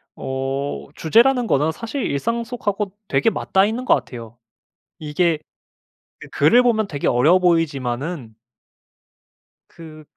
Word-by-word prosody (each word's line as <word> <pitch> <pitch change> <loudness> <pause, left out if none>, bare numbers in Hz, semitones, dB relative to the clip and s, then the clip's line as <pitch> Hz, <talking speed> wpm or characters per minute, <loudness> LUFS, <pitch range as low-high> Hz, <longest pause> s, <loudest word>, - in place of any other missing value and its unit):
어 135 +1 -4
주제라는 240 +8 +3
거는 150 +3 +1
사실 230 - -5
일상 230 +12 -2
속하고 210 -4 -3 0.2
되게 135 +9 +2
맞닿아 195 -3 +1
있는 230 +5 -3
것 - - +5
같아요. 115 -2 -8 0.6
이게 160 +2 0 0.8
그 - - -11
글을 245 +1 +4
보면 220 -4 +1
되게 145 -6 -4
어려워 145 +10 +4
보이지만은 145 -6 -1 1.4
그 155 -2 -13
165 Hz, 255 characters per minute, -20 LUFS, 140-220 Hz, 1.4 s, 것